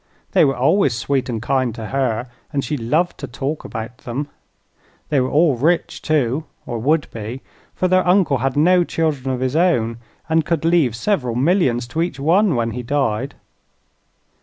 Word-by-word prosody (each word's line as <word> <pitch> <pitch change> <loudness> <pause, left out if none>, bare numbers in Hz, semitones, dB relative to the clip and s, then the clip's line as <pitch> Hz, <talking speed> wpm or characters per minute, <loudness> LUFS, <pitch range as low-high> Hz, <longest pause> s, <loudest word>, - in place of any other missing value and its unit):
They - - +5
were 135 - +2
always 140 - +3
sweet 130 +3 -1
and 115 -2 -2
kind 130 -3 0
to 110 -3 -6
her 130 -4 0 0.3
and 140 -2 -1
she 150 - -2
loved 150 +8 0
to - - -5
talk 140 +4 -4
about 115 +1 -7
them. 135 +5 -4 0.8
They 145 -2 +2
were 130 0 0
all 155 -2 +3
rich, 165 +7 0
too, 150 -1 0 0.2
or 120 -2 -4
would 150 +6 +2
be; 115 +4 -6 0.3
for 185 - +1
their 185 0 +2
uncle 180 -7 +3
had 135 +2 -1
no 175 +4 +5
children 155 -6 -1
of 130 -1 -3
his 130 +2 -1
own 120 -10 +2 0.3
and 160 0 +2
could 160 0 -1
leave 165 -9 +3
several 125 - -1
millions 130 -4 +2
to 160 +6 -1
each 165 -5 -2
one 175 +4 +3
when 115 -1 0
he 125 +3 -4
died. 130 0 -1
140 Hz, 180 wpm, -20 LUFS, 120-160 Hz, 0.8 s, They